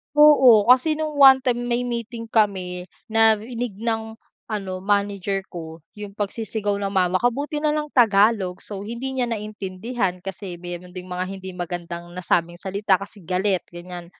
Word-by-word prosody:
Oo, 260 -7 +7
kasi 285 +5 +5
nung 305 -1 -4
one 265 -1 +8
time 245 -1 0
may 240 0 0
meeting 235 -1 -5
kami, 185 -4 0 0.2
narinig 225 +1 +2
ng 225 -1 -2 0.3
ano 195 -4 -4
manager 200 0 0
ko 160 -2 -8 0.2
yung 205 -1 -8
pagsisigaw 210 0 -2
ng 200 -1 -3
mama 185 -1 +2
ko, 245 0 +1
buti 295 +2 -3
na 300 0 +1
lang 300 -1 -3
tagalog. 205 -5 +3
So, 200 -1 -7
hindi 235 +4 -4
niya 255 -2 -1
naintindihan 210 -2 -3
kasi 195 -1 -6
meron 175 +1 -8
ding 180 0 -8
mga 180 +1 -2
hindi 190 0 -7
magandang 175 -1 -6
nasabing 175 -1 0
salita 195 +2 0
kasi 200 -2 -5
galit, 185 +1 0
ganiyan. 175 0 -8
205 Hz, 155 wpm, -23 LUFS, 185-235 Hz, 0.3 s, one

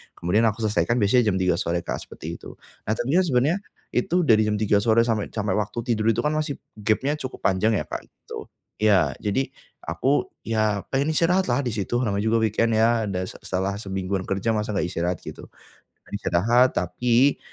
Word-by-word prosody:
kemudian 95 +7 +1
aku 110 +1 -2
selesaikan 110 +2 +1
biasanya 120 +4 +4
jam - - -1
03:00 90 -2 +2
sore 85 -1 -1
Kak - - -3
seperti - - -8
itu. - - -11 0.3
Nah, 110 - +2
tapi 120 +4 -2
kan - - +4
sebenarnya 140 +5 +2 0.3
itu 180 -1 +1
dari 110 -7 +4
jam 105 - +1
03:00 105 -1 +2
sore 115 +2 +3
sampai 110 -3 -1
sampai 105 -2 -1
waktu 105 +3 -3
tidur 110 -3 0
itu 110 - -1
kan 150 - +1
masih 155 -2 -1 0.2
gapnya 110 +7 +1
cukup 130 -3 -7
panjang 100 +4 +2
ya - - 0
Kak, - - -7
gitu. - - -10 0.3
Iya 100 -4 +4
jadi, 105 +5 0 0.4
aku 140 +2 0
ya 110 -3 0
pengen 140 +4 0
istirahat 180 +4 +2
lah, 120 +2 +1
di 130 - -2
situ 110 0 -4
namanya 100 -3 -1
juga 115 0 +2
weekend 110 +1 +1
ya, 115 0 +3
dan 95 -3 -2
se - - -10
setelah 95 +1 -1
semingguan 95 -2 -3
kerja 100 +3 -1
masa 105 -1 0
enggak 95 -3 -1
istirahat 90 0 -2
gitu. - - -9 0.6
Nah - - -22
istirahat 115 +10 +3
tapi 120 +9 +2
110 Hz, 195 wpm, -24 LUFS, 100-125 Hz, 0.6 s, biasanya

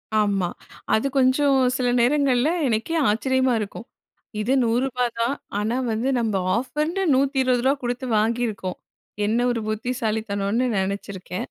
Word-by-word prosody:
ஆமா. 200 -4 +1 0.4
அது 220 +5 +2
கொஞ்சம் 270 +2 +3 0.2
சில 250 - 0
நேரங்கள்ல, 265 +1 +3 0.2
எனக்கே 230 +8 -1
ஆச்சரியமா 260 +4 +1
இருக்கும். 215 +2 -6 0.6
இது 240 +5 +1
ரூ.100 250 +2 0
தான். 235 +4 +1 0.2
ஆனா 220 +3 -1 0.2
வந்து 225 +4 -1
நம்ம 225 -3 -1 0.2
ஆஃபர்ன்டு 300 +9 -2
ரூ.120 265 -1 +2
குடுத்து 245 +2 -2
வாங்கிருக்கோம். 215 -4 -1 0.5
என்ன 220 +3 +1
ஒரு 235 -2 -2
புத்திசாலித்தனோன்னு 220 -1 -1
நினைச்சிருக்கேன். 190 -1 -4
240 Hz, 115 wpm, -23 LUFS, 215-260 Hz, 0.6 s, கொஞ்சம்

